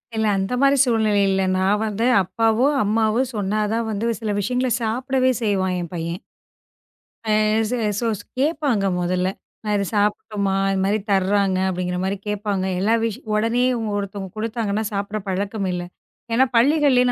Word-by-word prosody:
இல்ல 220 0 +1
அந்த 195 +5 -2
மாரி 275 0 +4
சூழ்நிலை 220 -5 +2
இல்ல. 195 0 +1 0.2
நான் 195 +3 +2
வந்து 220 +2 -1 0.2
அப்பாவும் 225 +8 +1
அம்மாவும் 225 +4 +1
சொன்னாதான் 215 +2 -1
வந்து 225 +2 -1
சில 215 -2 -1
விஷயங்கள 250 +5 0
சாப்பிடவே 255 +3 +1
செய்வான் 190 -3 +1
என் 170 - -7
பையன். 170 +1 -4 1.0
அ 220 - -5 0.4
ச - - -2 0.3
சோ 235 - -1 0.3
கேப்பாங்க 280 -7 +1 0.2
முதல்ல. 180 +1 0 0.4
நான் 210 -1 0
இதை 200 - 0
சாப்பிடட்டுமா? 205 -1 0 0.2
இந்த 190 - 0
மாரி 205 +2 +2
தர்றாங்க 195 0 +2
அப்படிங்கிற 180 -1 -2
மாரி 190 +1 -1
கேப்பாங்க. 205 -2 -1
எல்லா 210 +4 +2
விஷய 230 +2 -2
உடனே 230 +3 +1
இவங்க 225 -3 -2
ஒருத்தவங்க 200 -1 -5
கொடுத்தாங்கன்னா 220 -1 -2
சாப்பிடுற 200 +2 -2
பழக்கம் 195 +1 -2
இல்லை. 175 0 -3 0.5
ஏன்னா 255 +3 +5
பள்ளிகள்லயும் 255 -1 +4
210 Hz, 145 wpm, -22 LUFS, 195-230 Hz, 1.0 s, ஏன்னா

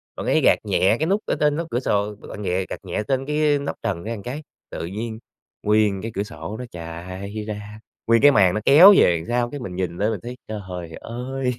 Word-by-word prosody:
bạn - - -5
ấy - - +3
gạt - - +5
nhẹ 100 +5 +2
cái 160 - +1
nút 200 +3 +1
ở - - 0
trên 150 -1 +3
nóc 165 +1 -3
cửa 120 - +1
sổ, 105 -4 0
bạn 105 0 -10
ghẹ 95 0 0
gạt - - -5
nhẹ 95 +3 -3
trên 135 -1 0
cái 150 -1 +2
nóc 140 - -4
trần 95 -7 -2
ra 115 +2 -4
cái, 140 +5 -5 0.3
tự - - -4
nhiên 110 +4 -5 0.4
nguyên 105 -2 +2
cái 115 +1 -5
cửa 100 - 0
sổ 110 -1 -7
nó 125 - -5
chạy 90 +4 -7
ra, 105 0 -7 0.3
nguyên 115 0 +4
cái 145 0 +8
màn 95 -7 +4
nó 105 - 0
kéo 175 +9 +9
về 85 - +5
đằng 80 - -7
sau. 120 0 0
Cái 145 - -5
mình 95 -8 -6
nhìn 90 -2 -3
lên 105 +2 +1
mình 105 - -3
thấy, 125 +1 -7
trời 110 -1 -5 0.4
ơi, 125 +2 -3
110 Hz, 240 wpm, -22 LUFS, 100-130 Hz, 0.4 s, kéo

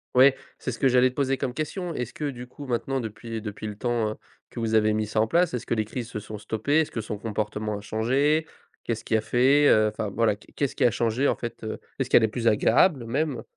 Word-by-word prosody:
Ouais, 135 +1 +7 0.2
c'est 125 - -4
ce - - -8
que 135 - +4
j'allais 125 0 +5
te 125 - -14
poser 135 -1 +1
comme 125 - -2
question. 165 +4 -3
Est-ce 125 -3 -4
que, 150 -1 -3
du 125 -2 -8
coup, 145 +3 -10
maintenant 130 +1 -1
depuis 115 0 -6
depuis 105 0 -6
le 105 - -6
temps, 120 -1 0
hein, 110 - -6 0.3
que - - -8
vous 110 -1 -1
avez 110 -1 +4
mis 110 0 0
ça 110 +1 0
en 110 - +2
place, 175 +6 +2
est-ce 125 - -3
que - - -1
les 110 -1 0
crises 120 +2 -5
se 105 - -5
sont 105 +1 -8
stoppées? 110 +8 0
Est-ce 155 - -3
que 115 - -3
son 105 -1 -5
comportement 105 0 -3
a 100 - -8
changé? 135 +9 +1 0.4
Qu'est-ce 115 -1 -3
qui - - 0
a 110 - 0
fait, 130 +6 +4
heu, 110 -4 +5
enfin 105 -1 -4
voilà. 110 0 +1
Qu 105 - -21
qu'est-ce 140 -2 -1
qui - - +2
a 120 - +5
changé 120 +5 +1
en - - +2
fait, 120 -1 -7
heu? 110 - -4 0.2
Est-ce 130 - -1
qu'elle 115 - +6
est - - +4
plus 115 +1 -2
agréable, 125 - +4
même? 135 +2 -1
115 Hz, 265 wpm, -26 LUFS, 110-135 Hz, 0.4 s, Ouais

